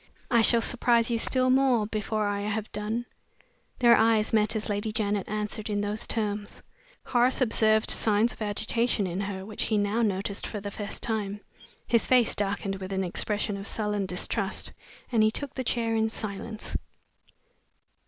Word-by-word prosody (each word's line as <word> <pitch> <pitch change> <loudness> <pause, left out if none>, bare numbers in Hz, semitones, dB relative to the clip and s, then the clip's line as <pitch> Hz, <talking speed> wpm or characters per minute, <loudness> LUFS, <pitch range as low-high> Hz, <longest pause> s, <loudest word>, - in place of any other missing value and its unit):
"I 235 -2 +5
shall 230 +1 +5
surprise 235 -1 +2
you 230 - +1
still 255 +2 +3
more 260 -4 +3
before 215 0 -2
I 200 0 -2
have 210 +1 -3
done." 220 +3 -3 0.7
Their 235 -1 +6
eyes 220 0 +2
met 215 0 +2
as 215 - -2
Lady 205 +1 -2
Janet 210 -2 -1
answered 210 +1 -3
in 205 -1 0
those 205 +1 -2
terms. 210 -2 -3 0.4
Horace 245 +1 +2
observed 220 -3 +3
signs 220 +2 +3
of - - -17
agitation 215 +1 0
in 180 0 -3
her, 195 -1 -4
which 210 0 -3
he 215 - +1
now 205 +3 +1
noticed 200 -2 -1
for 210 - -5
the 200 0 -6
first 205 0 -5
time. 210 -3 -2 0.4
His 235 -1 +2
face 250 -3 +4
darkened 195 -1 -1
with 190 0 -7
an 190 0 0
expression 205 +3 -1
of 195 +1 -6
sullen 210 -2 -2
distrust 180 -1 -1 0.4
and 230 -3 +3
he 215 - +5
took 275 +5 -2
the 260 - -3
chair 230 -2 0
in 220 0 +1
silence. 215 +1 -4
215 Hz, 170 wpm, -27 LUFS, 205-230 Hz, 0.7 s, Their